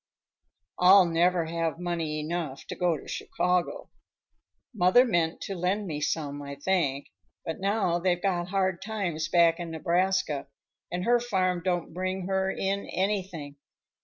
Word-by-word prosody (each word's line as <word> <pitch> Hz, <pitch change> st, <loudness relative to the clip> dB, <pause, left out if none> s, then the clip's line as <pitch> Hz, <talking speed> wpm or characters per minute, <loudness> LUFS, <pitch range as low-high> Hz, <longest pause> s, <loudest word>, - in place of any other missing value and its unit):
"I'll 185 Hz, +1 st, +8 dB
never 170 Hz, +1 st, +2 dB
have 165 Hz, -1 st, -2 dB
money 165 Hz, -3 st, -2 dB
enough 155 Hz, -3 st, -4 dB
to -, -, -6 dB
go 175 Hz, -3 st, +1 dB
to -, -, -13 dB
Chicago. 180 Hz, -1 st, -1 dB, 0.8 s
Mother 200 Hz, +5 st, +5 dB
meant 170 Hz, -8 st, 0 dB
to 195 Hz, -, -4 dB
lend 190 Hz, +3 st, -1 dB
me 150 Hz, -5 st, -4 dB
some, 145 Hz, -2 st, -2 dB
I 140 Hz, 0 st, -7 dB
think, 145 Hz, -3 st, 0 dB, 0.4 s
but 160 Hz, -, -4 dB
now 195 Hz, -3 st, +1 dB
they've 175 Hz, 0 st, +1 dB
got 175 Hz, -2 st, -1 dB
hard 190 Hz, -1 st, 0 dB
times 185 Hz, -8 st, -2 dB
back 170 Hz, -1 st, +4 dB
in 170 Hz, -1 st, -5 dB
Nebraska, 175 Hz, -2 st, 0 dB, 0.4 s
and 180 Hz, +1 st, -2 dB
her 240 Hz, +1 st, +4 dB
farm 185 Hz, -6 st, 0 dB
don't 175 Hz, -3 st, -1 dB
bring 185 Hz, +1 st, -3 dB
her 190 Hz, 0 st, 0 dB
in 195 Hz, +1 st, -2 dB
anything. 185 Hz, -7 st, -2 dB
175 Hz, 145 wpm, -28 LUFS, 165-190 Hz, 0.8 s, I'll